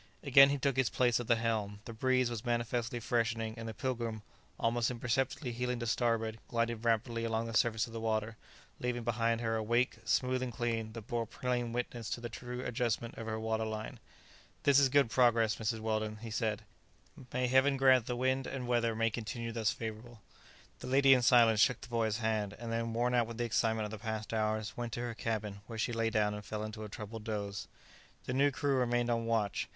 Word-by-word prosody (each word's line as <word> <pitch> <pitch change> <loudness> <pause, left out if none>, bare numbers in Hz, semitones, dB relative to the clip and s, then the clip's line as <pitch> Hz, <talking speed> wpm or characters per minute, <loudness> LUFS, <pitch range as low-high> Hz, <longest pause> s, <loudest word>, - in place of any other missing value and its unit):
Again 135 -1 +8
he 145 - +1
took 135 -1 0
his 130 -3 +3
place 120 -2 +2
at 120 - -5
the 120 - +5
helm. 110 -3 -1
The 115 - -7
breeze 130 +1 +1
was 115 -3 -4
manifestly 120 0 -1
freshening, 115 -1 0
and 115 -1 -7
the - - -5
"Pilgrim," 115 -4 -3 0.4
almost 115 0 +1
imperceptibly 125 +2 -1
heeling 125 +1 -2
to 120 - -3
starboard, 115 -1 0
glided 115 -1 -1
rapidly 115 0 +1
along 115 0 -1
the 115 - -5
surface 110 0 +2
of 115 - -12
the 115 - -4
water, 110 0 -1 0.4
leaving 125 -1 -2
behind 115 0 0
her 115 -1 0
a 110 - 0
wake, 120 +3 +1
smooth 130 +3 +1
and 130 -1 -2
clean, 115 -2 -2
that 115 -1 -7
bore 120 -1 -2
plain 120 0 -2
witness 120 -1 -3
to - - -2
the 120 0 -5
true 125 +2 -6
adjustment 120 -1 -1
of 115 - -7
her 110 0 -2
water 110 0 -1
line. 110 0 -5 0.6
"This 140 -1 +6
is 140 -2 +4
good 140 -3 +3
progress, 115 -3 +3
Mrs. 110 0 -2
Weldon," 110 -1 -1
he 115 - -6
said; 110 -1 -1 0.7
"may 125 0 0
Heaven 130 +2 +4
grant 130 -3 +5
the 125 - -1
wind 130 +1 0
and 130 -2 -4
weather 120 -2 +1
may 115 0 +1
continue 115 +1 -4
thus 110 -2 0
favourable!" 110 +1 -7 0.6
The - - -7
lady, 135 +1 +6
in 125 - +4
silence, 115 -3 +5
shook 125 +2 +4
the - - -11
boy's 115 -2 0
hand; 110 -3 -1
and 115 +1 -7
then, 115 0 -1
worn 120 +2 +1
out 120 -2 +3
with 115 -1 -7
the 120 - 0
excitement 110 -1 +1
of 105 - -6
the 110 - -6
past 110 -1 -4
hours, 110 -1 -1
went 120 -1 -4
to 120 - -3
her 120 -1 -3
cabin, 110 -3 -3
where 115 - -7
she 120 +2 -1
lay 115 0 +1
down 105 -1 +1
and 105 0 -6
fell 105 +1 -4
into 110 0 -6
a 105 - -7
troubled 105 +2 -7
doze. 100 -3 -4 0.6
The 125 - -3
new 140 +2 +4
crew 140 0 0
remained 120 -1 +1
on 115 -1 0
watch. 110 -4 0
115 Hz, 215 wpm, -33 LUFS, 110-125 Hz, 0.7 s, Again